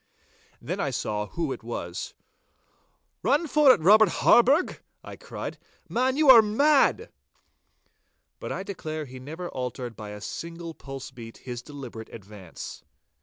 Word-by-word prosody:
Then - - -4
I - - 0
saw 105 0 -2
who 165 +1 -3
it - - -5
was. 100 -7 -6 1.1
'Run 290 +5 +2
for 300 -3 +6
it, 255 - +3
Robert 210 +4 +7
Harburgh,' 270 - +4 0.2
I - - -9
cried. - - -7 0.3
'Man, 260 +2 0
you 305 -1 +3
are 235 -3 +10
mad.' 275 +7 +3 1.3
But - - -6
I 190 - -3
declare 155 -6 -5
he 130 -1 -10
never 160 +7 -7
altered 125 -2 -5
by 105 0 -8
a 105 0 -8
single 165 +8 -7
pulse 135 -1 -9
beat 115 -3 -11
his 120 -2 -5
deliberate 125 -5 -9
advance. 100 -4 -10
155 Hz, 140 wpm, -26 LUFS, -, 1.3 s, are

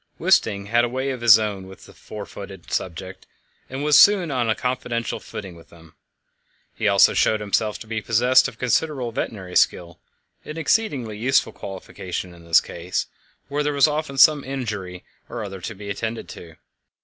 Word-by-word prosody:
Wisting 115 - +2
had 120 +3 +2
a 120 - 0
way 130 +2 -2
of 125 -2 -6
his 115 -3 +8
own 100 -4 -4
with 95 -1 -13
his - - -17
four 105 -1 -9
footed 95 -3 -11
subjects, 95 +1 -5 0.4
and 135 +2 -5
was 150 -1 +3
soon 190 -2 +6
on 125 -4 0
a 110 - +2
confidential 125 -2 -3
footing 95 -4 -9
with 85 - -17
them. 80 -2 -18 0.8
He 110 - -1
also 100 -1 +5
showed 110 - +2
himself 105 +1 -1
to - - -11
be 110 0 -4
possessed 125 +5 +4
of 130 -4 -10
considerable 125 +1 -1
veterinary 95 -5 -5
skill 85 -1 +1 0.4
an 155 - -8
exceedingly 140 - 0
useful 130 +4 +1
qualification 95 -1 -7
in 85 -1 -16
this 85 -1 +5
case, - - -4 0.4
where 145 +1 -2
there 150 0 -1
was 140 +1 +5
often 150 -2 -3
some 145 +1 +6
injury 105 -9 -5 0.3
or 120 - -5
other 95 -2 -7
to 110 +4 -6
be 100 +1 -7
attended 115 +3 -4
to. 80 -2 -11
110 Hz, 180 wpm, -22 LUFS, 95-130 Hz, 0.8 s, his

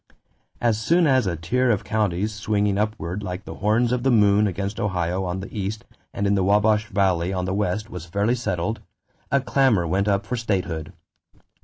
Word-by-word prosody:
As 115 -2 +1
soon 170 +9 +3
as 130 -7 +3
a 85 - -1
tier 125 +11 0
of 105 -5 +1
counties 105 -1 -1
swinging 105 -1 0
upward 105 -3 -2
like 95 0 -5
the - - -7
horns 115 +4 +1
of 125 -1 0
the 135 - +2
moon 105 -3 +4
against 100 +2 -3
Ohio 90 -2 -1
on 90 +1 -3
the 100 - -9
east 105 +1 -4 0.3
and 100 - -2
in 100 - +2
the 95 -2 +2
Wabash 105 +2 +3
Valley 95 -3 +1
on 90 -1 -2
the 95 - -2
west 105 +1 -1
was 90 -1 -7
fairly 100 +7 +1
settled, 110 -3 -2 0.5
a 140 - +4
clamor 130 -8 +2
went 95 +5 0
up 100 -1 +1
for 125 - -3
statehood. 90 -8 -2
100 Hz, 190 wpm, -23 LUFS, 95-110 Hz, 0.5 s, moon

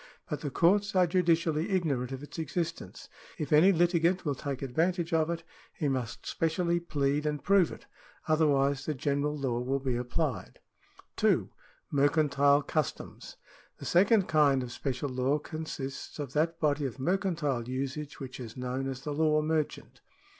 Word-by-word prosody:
But 150 -1 -2
the 145 - -3
courts 195 +8 +2
are 185 -1 +5
judicially 165 -1 +1
ignorant 145 -10 0
of 135 +1 -6
its 145 - -8
existence. 165 - -4 0.3
If 150 -1 -2
any 165 +6 +7
litigant 175 +1 +2
will 145 - +1
take 140 0 -5
advantage 170 +6 0
of 160 0 +2
it, 170 -1 -3 0.3
he 150 - -1
must 125 -4 -3
specially 170 +1 0
plead 145 -3 0
and 150 -1 -2
prove 195 -4 +4
it; - - -10 0.4
otherwise 140 -3 +2
the 155 - -1
general 145 +2 -1
law 130 -4 -1
will 130 +3 0
be 130 -2 -2
applied. 125 - -2 0.6
2. - - +2 0.4
Mercantile 145 0 +3
customs. 155 0 -4 0.2
— - - -28
The - - -9
second 195 +2 +4
kind 145 -4 +3
of 120 - -7
special 135 +2 -3
law 130 +3 +1
consists 150 -3 -6
of 140 -3 -5
that 165 +2 0
body 145 -2 +1
of 120 - -8
mercantile 155 -6 -1
usage 140 +3 -4
which 130 -2 -7
is 115 -2 -8
known 125 +1 -3
as 130 -1 -6
the 150 +1 -4
law 155 0 +2
merchant. 155 -1 -2
150 Hz, 160 wpm, -30 LUFS, 135-165 Hz, 0.6 s, any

